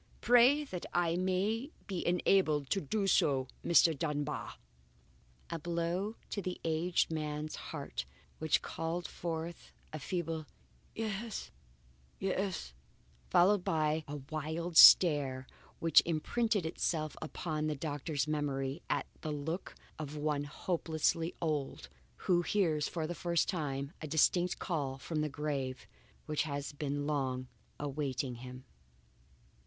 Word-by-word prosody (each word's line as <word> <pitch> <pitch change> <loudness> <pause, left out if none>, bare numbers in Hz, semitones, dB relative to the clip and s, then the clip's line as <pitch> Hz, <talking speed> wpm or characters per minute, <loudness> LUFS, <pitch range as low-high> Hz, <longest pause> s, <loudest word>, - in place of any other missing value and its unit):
Pray 245 +5 +6
that 185 -11 -6
I 170 -1 +2
may 190 - 0 0.2
be 190 -3 -3
enabled 175 -5 +2
to 195 - +2
do 195 +8 -1
so, 135 -8 +3 0.2
Mr. 170 -1 +5
Dunbar." 150 0 -3 1.0
A 165 - -2
blow 170 +6 -2 0.2
to 200 - -2
the 185 -1 -4
aged 165 +2 +1
man's 155 -1 -3
heart - - -5 0.3
which 160 -1 +2
called 165 +2 -3
forth 165 0 -5 0.2
a 155 - -4
feeble 165 0 -3 0.5
"Yes, 220 0 -4 0.7
yes," 190 - -2 0.6
followed 190 +1 +5
by 155 -1 +1
a 145 - -5 0.2
wild 160 +3 -3
stare 140 -7 +8 0.3
which 165 -1 +6
imprinted 205 +5 0
itself 155 -1 -1
upon 155 0 -3
the 155 - -1
doctor's 145 0 -2
memory 140 -1 -1
as - - +1 0.2
the 155 - -3
look 155 +5 -4 0.2
of 150 -1 -5
one 150 -1 0
hopelessly 165 +1 -1
old, 150 - -2 0.4
who 175 -2 +4
hears 165 -5 +1
for 165 -2 -3
the 170 - -3
first 170 -1 +1
time 140 -5 -2
a 155 - -4
distinct 175 +4 +3
call 140 -7 -2
from 155 +3 -3
the 155 - 0
grave 140 -3 -3 0.4
which 150 -1 0
has 145 -2 -3
long 145 -3 -1
been - - -16 0.3
awaiting 140 -3 -2
him! 125 +1 -9
155 Hz, 125 wpm, -33 LUFS, 145-175 Hz, 1.0 s, stare